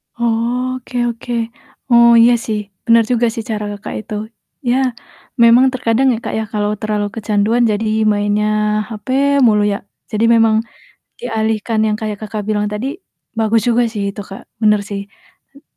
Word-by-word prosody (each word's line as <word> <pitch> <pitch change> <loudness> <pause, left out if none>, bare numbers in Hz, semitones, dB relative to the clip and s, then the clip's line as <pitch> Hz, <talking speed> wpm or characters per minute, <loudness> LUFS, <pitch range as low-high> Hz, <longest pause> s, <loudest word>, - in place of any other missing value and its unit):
Oke 245 +2 -2
oke. 235 +1 -6 0.6
Oh, 235 0 +7
iya 240 +1 +6
sih. 215 -1 -1 0.3
Bener 230 -1 +5
juga 240 -1 +2
sih 225 - -5
cara 210 -1 -2
Kakak 205 0 -7
itu. 215 - -9 0.5
Iya 245 +1 +2 0.7
memang 235 +2 +6
terkadang 250 +1 +1
ya, - - -2
Kak, - - -4
ya - - -1
kalau 210 0 0
terlalu 210 -1 -1
kecanduan 220 +2 +1
jadi 210 +2 -1 0.3
mainnya 205 +1 0 0.4
hape 225 +4 -5 0.3
mulu 210 -1 +3
ya. 200 - -3 0.3
Jadi 215 +2 +1
memang 225 -1 +4 0.6
dialihkan 220 -1 -1
yang 210 - 0
kayak 215 -2 -4
Kakak 215 0 -5
bilang 210 -1 0
tadi, 210 +5 -3 0.5
bagus 225 0 +2
juga 240 0 +3
sih 210 - -4
itu, 205 - -7
Kak. 195 0 -10 0.2
Bener 210 -1 +4
sih. 200 -1 -4 0.5
Hmm 280 +1 -19
220 Hz, 155 wpm, -17 LUFS, 210-235 Hz, 0.7 s, Oh